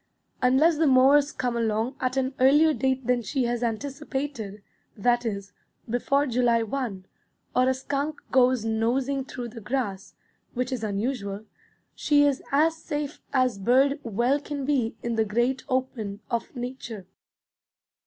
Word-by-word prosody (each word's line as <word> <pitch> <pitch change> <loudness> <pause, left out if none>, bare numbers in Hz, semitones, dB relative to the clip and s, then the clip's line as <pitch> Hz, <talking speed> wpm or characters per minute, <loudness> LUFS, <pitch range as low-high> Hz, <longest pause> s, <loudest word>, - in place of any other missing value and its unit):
Unless 280 +6 +4
the 320 - +4
mowers 275 +2 +5
come 245 -2 -2
along 225 +2 0
at 255 +1 -1
an 265 0 0
earlier 295 +5 +5
date 265 -2 0
than 250 0 +2
she 255 +4 -1
has 240 0 -1
anticipated, 260 -3 -4 0.3
that 240 +3 +2
is, 200 -3 -5 0.3
before 275 +5 +1
July 240 -2 +2
1, 220 -5 -4 0.5
or 255 +1 +4
a - - +3
skunk 285 +3 -3
goes 255 -3 +3
nosing 250 +5 0
through 245 -2 -6
the 230 0 -10
grass, 210 -4 -3 0.4
which 250 +1 -1
is 250 -4 -3
unusual, 205 -1 -3 0.5
she 290 -1 +3
is 280 -2 +1
as 320 +4 +3
safe 295 -2 -4
as 255 -6 +1
bird 265 +7 +3
well 240 +4 +1
can 285 -1 -5
be 260 -5 0
in 235 -1 -2
the 220 - +4
great 240 +5 0
open 245 -6 -2
of 235 +3 -3
nature. 245 -5 -6
255 Hz, 145 wpm, -26 LUFS, 225-275 Hz, 0.5 s, mowers